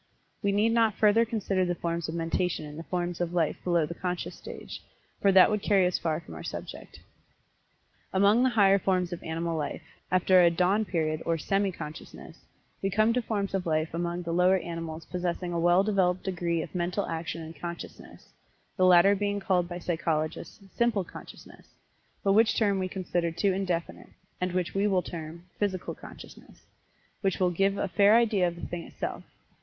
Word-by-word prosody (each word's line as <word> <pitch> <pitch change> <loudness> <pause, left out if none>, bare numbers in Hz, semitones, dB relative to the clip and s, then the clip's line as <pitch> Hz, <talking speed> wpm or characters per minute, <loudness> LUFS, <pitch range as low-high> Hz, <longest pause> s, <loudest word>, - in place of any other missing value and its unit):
We 200 - +1
need 210 +3 +2
not 225 -3 +3
further 220 +2 +4
consider 205 -4 -1
the 175 -1 -1
forms 170 -1 -3
of 160 - -4
mentation 165 0 -1
in 150 0 -9
the 160 - -6
forms 175 0 -3
of 175 0 -2
life 165 -3 0
below 170 -3 +2
the 170 - -6
Conscious 180 0 -4
stage, - - -9 0.4
for 200 - +5
that 190 +2 +7
would 210 -1 0
carry 195 -3 +3
us 180 - 0
far 160 -2 -1
from 165 - -12
our 80 - -8
subject. - - -8 1.1
Among 200 +5 +4
the 260 - +4
higher 200 -4 +4
forms 185 -2 0
of 175 - -6
animal 165 +1 -3
life, 150 -2 -4 0.3
after 185 0 +5
a 170 - +6
"dawn 185 +5 +1
period" 155 -4 -1
or 165 -1 0
semi 195 +5 0
consciousness, 155 -3 -10 0.4
we 195 - 0
come 215 +4 +3
to 250 - +1
forms 205 -4 -2
of 190 -2 -1
life 155 0 0
among 175 +1 -2
the 170 - -4
lower 180 +2 +4
animals 165 -2 -6
possessing 180 0 -3
a 170 - 0
well 175 +3 +4
developed 185 -3 +1
degree 170 -3 -1
of - - -10
mental 180 +2 -1
action 165 0 -4
and 160 +1 -9
Consciousness, 170 0 -9 0.5
the 185 - +4
latter 180 +2 +7
being 205 0 -1
called 180 -3 0
by 175 - -5
psychologists 160 -1 -2
"Simple 235 -5 +1
Consciousness," - - -13 0.6
but 195 - +3
which 220 +2 +4
term 200 -3 +2
we 185 - -1
consider 180 -2 -2
too 190 +4 +1
indefinite, 180 -3 -3 0.3
and 180 -1 -1
which 180 -1 -1
we 200 +1 +1
will 185 -3 +2
term 165 +1 -8
"Physical 190 -3 -2
Consciousness," - - -13 0.6
which 195 -3 0
will 180 -1 +2
give 195 +3 +1
a 200 - -1
fair 200 +3 +5
idea 215 -6 +3
of 170 - -4
the 170 - -7
thing 175 -1 -5
itself. - - -6
180 Hz, 190 wpm, -28 LUFS, 170-200 Hz, 1.1 s, that